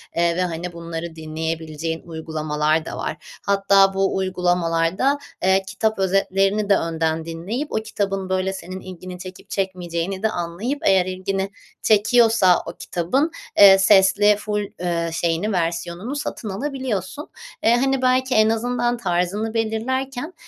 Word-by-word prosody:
eee, 170 Hz, 0 st, +2 dB
ve, -, -, +1 dB
hani, 175 Hz, 0 st, -3 dB
bunları 170 Hz, 0 st, -6 dB
dinleyebileceğin 160 Hz, 0 st, -4 dB
uygulamalar 155 Hz, -1 st, -1 dB
da -, -, -6 dB
var. 155 Hz, -, -3 dB, 0.3 s
Hatta, 195 Hz, -1 st, +4 dB
bu 195 Hz, 0 st, +1 dB
uygulamalarda, 180 Hz, +6 st, +1 dB, 0.3 s
eee, 190 Hz, +1 st, +3 dB
kitap 220 Hz, -2 st, -1 dB
özetlerini 195 Hz, +2 st, +1 dB
de 200 Hz, -, +5 dB
önden 160 Hz, -1 st, -1 dB
dinleyip 190 Hz, -, -4 dB
o -, -, -3 dB
kitabın, 195 Hz, -3 st, -2 dB
böyle, 185 Hz, 0 st, 0 dB
senin 185 Hz, 0 st, -7 dB
ilgini 185 Hz, -1 st, -9 dB
çekip 185 Hz, 0 st, -10 dB
çekmeyeceğini 185 Hz, 0 st, -3 dB
de 220 Hz, -, +3 dB
anlayıp 190 Hz, +10 st, -3 dB
eğer 190 Hz, -2 st, +4 dB
ilgini 190 Hz, +1 st, -2 dB, 0.3 s
çekiyorsa 220 Hz, -3 st, +4 dB
o -, -, -6 dB
kitabın, 260 Hz, -, 0 dB, 0.3 s
eee, 195 Hz, -1 st, +9 dB
sesli 200 Hz, +1 st, +5 dB
ful 210 Hz, 0 st, -2 dB, 0.2 s
eee, 170 Hz, -1 st, -1 dB
şeyini, 170 Hz, +5 st, 0 dB
versiyonunu 175 Hz, +6 st, -2 dB
satın 245 Hz, -6 st, -4 dB
alabiliyorsun. 260 Hz, -, -4 dB, 0.3 s
Eee, 230 Hz, +2 st, +5 dB
hani, 270 Hz, +1 st, +1 dB
belki 255 Hz, 0 st, +2 dB
en 215 Hz, 0 st, +5 dB
azından 240 Hz, +1 st, 0 dB
tarzını 195 Hz, +2 st, -1 dB
belirlerken, 245 Hz, +7 st, -2 dB
190 Hz, 135 wpm, -22 LUFS, 170-220 Hz, 0.3 s, eee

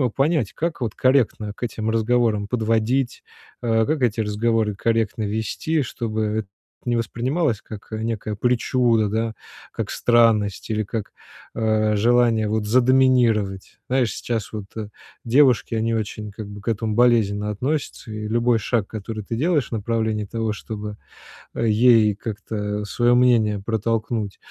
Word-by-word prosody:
понять, 140 Hz, -, +1 dB
как 170 Hz, +1 st, -3 dB
вот 115 Hz, -4 st, -2 dB
корректно 125 Hz, -5 st, +1 dB
к -, -, -10 dB
этим 110 Hz, -2 st, -2 dB
разговорам 110 Hz, -2 st, +1 dB
подводить, 115 Hz, +3 st, 0 dB, 0.4 s
э, 115 Hz, -2 st, +2 dB
как 155 Hz, -2 st, -1 dB
эти 120 Hz, -2 st, +1 dB
разговоры 110 Hz, 0 st, 0 dB
корректно 115 Hz, 0 st, 0 dB
вести, 110 Hz, +9 st, -1 dB
чтобы 110 Hz, -3 st, -3 dB
это 105 Hz, -1 st, -2 dB, 0.4 s
не 120 Hz, -1 st, +1 dB
воспринималось, 120 Hz, +2 st, -1 dB
как, 105 Hz, -2 st, -10 dB
э, 110 Hz, -, -3 dB
некая 110 Hz, -2 st, -3 dB
причуда, 120 Hz, -1 st, +2 dB
да, 110 Hz, +1 st, -1 dB, 0.4 s
как -, -, -4 dB
странность 115 Hz, -4 st, +2 dB
или 110 Hz, -1 st, 0 dB
как, 105 Hz, +1 st, -5 dB, 0.4 s
э, 110 Hz, -1 st, +1 dB
желание, 115 Hz, 0 st, +3 dB
вот, 110 Hz, -1 st, -1 dB
задоминировать. 120 Hz, -4 st, +2 dB
Знаешь, 125 Hz, -5 st, +1 dB
сейчас 115 Hz, -4 st, -3 dB
вот, 105 Hz, -2 st, -5 dB
э, 110 Hz, -2 st, -5 dB, 0.4 s
девушки, 125 Hz, -1 st, +3 dB
они 115 Hz, +1 st, 0 dB
очень, 105 Hz, -1 st, -4 dB
как 105 Hz, +1 st, -8 dB
бы, 105 Hz, 0 st, -9 dB
к 100 Hz, -, -19 dB
этому 110 Hz, -1 st, -1 dB
болезненно 105 Hz, -4 st, +3 dB
относятся. 130 Hz, +1 st, -3 dB
И 105 Hz, 0 st, -5 dB
любой 120 Hz, +1 st, +2 dB
шаг, 110 Hz, -2 st, -1 dB
который 110 Hz, 0 st, -6 dB
ты 115 Hz, -, -4 dB
делаешь 150 Hz, 0 st, +1 dB
в -, -, -31 dB
направлении 110 Hz, -1 st, -1 dB
того, 115 Hz, +1 st, -2 dB
чтобы, 105 Hz, -1 st, -7 dB, 0.6 s
э, 115 Hz, -, 0 dB
ей 110 Hz, -1 st, +5 dB
как-то 105 Hz, -1 st, -4 dB
своё 120 Hz, +3 st, +2 dB
мнение 115 Hz, -5 st, +3 dB
протолкнуть, 110 Hz, -1 st, -1 dB
110 Hz, 145 wpm, -22 LUFS, 105-120 Hz, 0.6 s, ей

